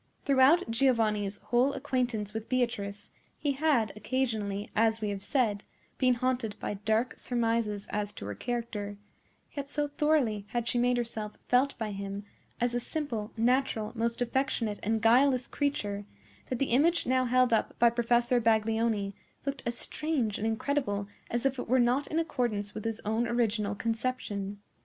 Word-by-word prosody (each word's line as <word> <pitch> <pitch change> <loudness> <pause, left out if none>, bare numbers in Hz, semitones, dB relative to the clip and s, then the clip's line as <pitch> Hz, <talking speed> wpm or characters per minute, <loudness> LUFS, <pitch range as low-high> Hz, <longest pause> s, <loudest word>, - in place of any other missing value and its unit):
Throughout 280 +6 +5
Giovanni's 220 -5 +2
whole 250 +6 +2
acquaintance 245 -6 -1
with 220 0 -5
Beatrice, 210 -5 -1 0.3
he 290 - 0
had 275 -6 +2
occasionally, 215 -3 -2
as 225 0 +3
we 210 -1 -2
have 200 -1 -3
said, 215 -4 0 0.4
been 255 -2 +4
haunted 245 -3 -1
by - - -3
dark 220 +4 0
surmises 230 -4 0
as 205 -1 -1
to - - -8
her 105 - -4
character; 210 - -4 0.6
yet 280 -1 -4
so 290 0 0
thoroughly 285 -9 +1
had 240 -1 -1
she 245 - +1
made 245 0 +3
herself 220 -3 -3
felt 260 +3 +3
by 220 -2 -3
him 200 0 -5 0.4
as 240 0 +1
a 245 - +1
simple, 240 -6 -3
natural, 235 -2 +1
most 235 +1 0
affectionate, 235 -4 -1
and 220 +1 0
guileless 250 +3 +5
creature, 205 -8 -2 0.4
that 255 - -1
the 270 0 -1
image 325 +8 +3
now 255 0 +2
held 250 0 +3
up 225 - +1
by 235 0 +5
Professor 240 +1 +2
Baglioni 220 -2 +1 0.3
looked 275 -1 -3
as 240 0 -1
strange 280 -10 -1
and 220 - 0
incredible 225 -3 -1 0.2
as 240 +2 -2
if 265 -1 +1
it - - -5
were 260 +1 +4
not 250 +4 +2
in 315 - -2
accordance 235 -10 -1
with 215 - -6
his 225 -1 -2
own 220 +3 0
original 215 -4 0
conception. 220 -3 -3
235 Hz, 160 wpm, -30 LUFS, 210-255 Hz, 0.6 s, Throughout